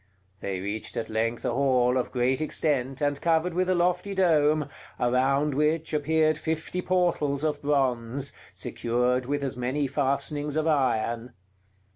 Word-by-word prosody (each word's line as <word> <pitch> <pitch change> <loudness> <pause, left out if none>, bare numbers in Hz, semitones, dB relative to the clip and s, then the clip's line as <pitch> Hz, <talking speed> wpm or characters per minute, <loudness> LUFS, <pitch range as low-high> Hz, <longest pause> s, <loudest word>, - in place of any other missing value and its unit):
They 95 -2 -3
reached 100 +3 -5
at 110 - -3
length 115 +2 -1
a - - +1
hall 125 -1 +2
of 125 - -1
great 130 +2 +1
extent, 135 -4 -1
and 145 -1 0
covered 165 +1 +2
with 185 +1 0
a 185 - +3
lofty 180 +3 0
dome, 155 -5 +3 0.3
around 135 +4 +2
which 155 +3 0
appeared 155 +1 +2
fifty 160 +3 -2
portals 170 -6 +1
of 150 -2 -1
bronze, 135 -2 0 0.2
secured 125 +1 -1
with 145 0 -1
as 135 - -2
many 130 +4 -1
fastenings 145 +2 -1
of 155 0 +1
iron. 120 -5 0
140 Hz, 145 wpm, -27 LUFS, 125-155 Hz, 0.3 s, a